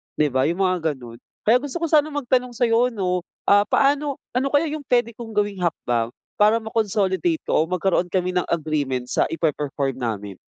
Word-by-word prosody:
'di 150 Hz, -, +2 dB
ba 130 Hz, 0 st, +2 dB
yung 175 Hz, +4 st, 0 dB
mga 170 Hz, -5 st, 0 dB
ganun. 120 Hz, -2 st, -12 dB, 0.2 s
Kaya 235 Hz, +3 st, +5 dB
gusto 285 Hz, -1 st, -7 dB
ko -, -, +3 dB
sana 305 Hz, -1 st, +5 dB
magtanong 250 Hz, -4 st, -1 dB
sa 245 Hz, -, 0 dB
'yo 230 Hz, +2 st, +3 dB
'no, 185 Hz, -5 st, -1 dB, 0.3 s
ah, 205 Hz, +1 st, +5 dB
paano 285 Hz, 0 st, +2 dB, 0.2 s
ano 255 Hz, +3 st, +1 dB
kaya 290 Hz, +3 st, +2 dB
yung 305 Hz, -3 st, -5 dB
pwede 240 Hz, -2 st, +2 dB
kong 225 Hz, -2 st, -9 dB
gawing 205 Hz, -2 st, 0 dB
hakbang 120 Hz, -9 st, 0 dB, 0.3 s
para 210 Hz, +2 st, +5 dB
ma-consolidate 220 Hz, -, 0 dB
ko 155 Hz, -, +2 dB
o -, -, -15 dB
magkaroon 180 Hz, 0 st, +1 dB
kami 180 Hz, 0 st, 0 dB
ng 180 Hz, -1 st, 0 dB
agreement 145 Hz, -6 st, -1 dB
sa -, -, +2 dB
ipe-perform 145 Hz, -4 st, -2 dB
namin? 105 Hz, -5 st, -4 dB
190 Hz, 190 wpm, -22 LUFS, 155-245 Hz, 0.3 s, Kaya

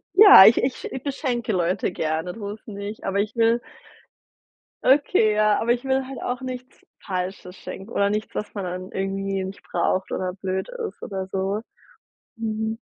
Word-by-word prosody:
Ja, 400 Hz, -, +11 dB
ich 225 Hz, -, +6 dB
ich 255 Hz, 0 st, -2 dB
ich 260 Hz, -, -5 dB
beschenke 255 Hz, -5 st, -2 dB
Leute 180 Hz, +1 st, 0 dB
gerne, 160 Hz, +3 st, -2 dB
so 205 Hz, -3 st, -6 dB
ist’s 215 Hz, -, -13 dB
nicht, 205 Hz, 0 st, -7 dB
aber 195 Hz, +1 st, -1 dB
ich 210 Hz, +1 st, -2 dB
will 230 Hz, +1 st, +3 dB, 1.2 s
okay, 265 Hz, -, +4 dB
ja 215 Hz, 0 st, +3 dB
aber 235 Hz, +1 st, +2 dB
ich 245 Hz, +2 st, -3 dB
will 265 Hz, 0 st, 0 dB
halt 270 Hz, -, -7 dB
auch 245 Hz, +1 st, -2 dB
nichts 255 Hz, -1 st, -7 dB, 0.2 s
Falsches 185 Hz, -1 st, -4 dB
schenken 195 Hz, +4 st, -9 dB
oder 200 Hz, -3 st, +2 dB
nichts, 210 Hz, +1 st, -3 dB
was 210 Hz, -, -4 dB
man 200 Hz, -, -3 dB
dann 185 Hz, +1 st, -6 dB
irgendwie 195 Hz, 0 st, -2 dB
nicht 190 Hz, +1 st, -8 dB
braucht 185 Hz, 0 st, 0 dB
oder 185 Hz, -1 st, -2 dB
blöd 190 Hz, 0 st, -2 dB, 0.2 s
ist -, -, -16 dB
oder 190 Hz, -2 st, -4 dB
so. 195 Hz, +2 st, -2 dB, 0.8 s
Mhm. 220 Hz, 0 st, -2 dB
210 Hz, 170 wpm, -24 LUFS, 190-235 Hz, 1.2 s, Ja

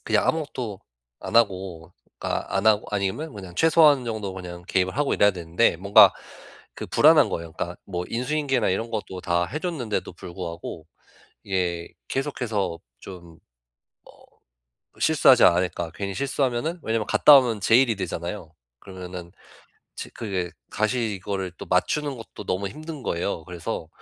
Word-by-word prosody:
그냥 -, -, +2 dB
아무것도 125 Hz, -10 st, -2 dB, 0.4 s
안 -, -, -2 dB
하고 95 Hz, -6 st, 0 dB, 0.3 s
그러니까 100 Hz, -, -3 dB
안 100 Hz, +3 st, 0 dB
하고 105 Hz, -1 st, +4 dB
아니면 105 Hz, +9 st, -2 dB
그냥 95 Hz, -3 st, -9 dB
최소한 150 Hz, -, +5 dB
정도 110 Hz, -4 st, -3 dB
그냥 90 Hz, -2 st, -8 dB
개입을 95 Hz, +4 st, 0 dB
하고 145 Hz, -1 st, +1 dB
이래야 100 Hz, -, +4 dB
되는데 85 Hz, +1 st, +1 dB
뭔가 100 Hz, +4 st, +7 dB, 0.6 s
그 -, -, -7 dB
불안한 -, -, +5 dB
거예요. 85 Hz, -1 st, -5 dB
그러니까 85 Hz, +2 st, -5 dB
뭐 90 Hz, -2 st, -4 dB
인수인계나 130 Hz, -1 st, 0 dB
이런 115 Hz, +5 st, -2 dB
것도 95 Hz, -4 st, -5 dB
다 85 Hz, 0 st, +1 dB
해 150 Hz, -, -4 dB
줬는데도 140 Hz, -, -3 dB
불구하고 85 Hz, -2 st, -7 dB, 0.6 s
이게 90 Hz, -3 st, -2 dB, 0.2 s
계속해서 115 Hz, -, -2 dB, 0.2 s
좀 85 Hz, -2 st, -12 dB, 1.6 s
어 -, -, -20 dB
'실수하지 -, -, +5 dB
않을까?' 85 Hz, -1 st, +2 dB
괜히 100 Hz, -1 st, -5 dB
실수하면은 140 Hz, +4 st, -1 dB
왜냐하면 110 Hz, -1 st, -1 dB
갔다 145 Hz, -2 st, +8 dB
오면 115 Hz, -5 st, +1 dB
제 110 Hz, -, +4 dB
일이 120 Hz, -5 st, +2 dB
되잖아요. 85 Hz, -2 st, -5 dB, 0.3 s
그러면은 90 Hz, -2 st, -9 dB, 0.6 s
지 -, -, -7 dB
그게 95 Hz, -6 st, -4 dB, 0.2 s
다시 110 Hz, 0 st, 0 dB
이거를 95 Hz, -1 st, -4 dB
또 -, -, -8 dB
맞추는 140 Hz, +10 st, 0 dB
것도 115 Hz, -2 st, -10 dB
너무 95 Hz, +2 st, -1 dB
힘든 155 Hz, +4 st, -8 dB
거예요. 85 Hz, -4 st, -2 dB
그래서 85 Hz, 0 st, -5 dB
100 Hz, 340 characters per minute, -24 LUFS, 90-120 Hz, 1.6 s, 갔다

